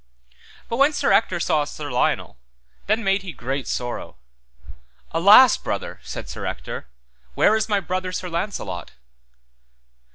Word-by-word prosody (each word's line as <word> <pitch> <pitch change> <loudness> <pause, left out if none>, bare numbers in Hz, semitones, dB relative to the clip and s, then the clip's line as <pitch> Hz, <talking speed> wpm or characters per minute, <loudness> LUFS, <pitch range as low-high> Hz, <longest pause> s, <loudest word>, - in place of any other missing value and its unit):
But 230 - -3
when 280 +3 +4
Sir 285 - +1
Ector 185 -6 +3
saw 155 -2 +1
Sir 145 -1 -7
Lionel, 125 - 0 0.5
then 215 +3 +1
made 195 0 +2
he 190 -2 -7
great 135 -1 -4
sorrow. 120 -1 -4 0.9
Alas, 205 +9 +7
brother, - - -5
said - - -7
Sir - - -7
Ector, - - -6 0.5
where 215 - +4
is 220 0 -1
my 205 -1 +2
brother 185 0 -3
Sir 185 0 -4
Launcelot? 170 - -4
185 Hz, 135 wpm, -22 LUFS, 150-210 Hz, 0.9 s, Alas